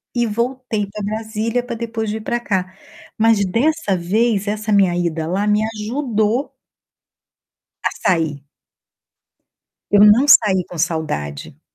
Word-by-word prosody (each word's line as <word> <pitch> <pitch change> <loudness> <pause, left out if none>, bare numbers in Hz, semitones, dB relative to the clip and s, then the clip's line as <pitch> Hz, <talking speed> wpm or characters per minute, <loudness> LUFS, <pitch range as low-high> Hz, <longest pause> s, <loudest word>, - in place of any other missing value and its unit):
e 240 -1 +2
voltei 235 -1 -2
pra 210 0 -7
Brasília 220 +3 -2
pra 245 -1 -6
depois 225 -1 -4
vir 220 +1 -4
pra 240 - -1
cá. 190 -4 -2 0.4
Mas, 225 -3 +3
dessa 245 - 0
vez, 205 +3 0
essa 215 +1 -2
minha 190 -3 +3
ida 165 -2 -2
lá 195 +4 -1
me 210 0 +2 0.2
ajudou 225 +1 -1 1.3
a - - +1 0.2
sair. 160 -5 0 1.5
Eu 205 0 +6
não 215 +6 +6
saí 190 -8 +5
com 175 - -9
saudade. 150 - -3
210 Hz, 130 wpm, -19 LUFS, 185-230 Hz, 1.5 s, Eu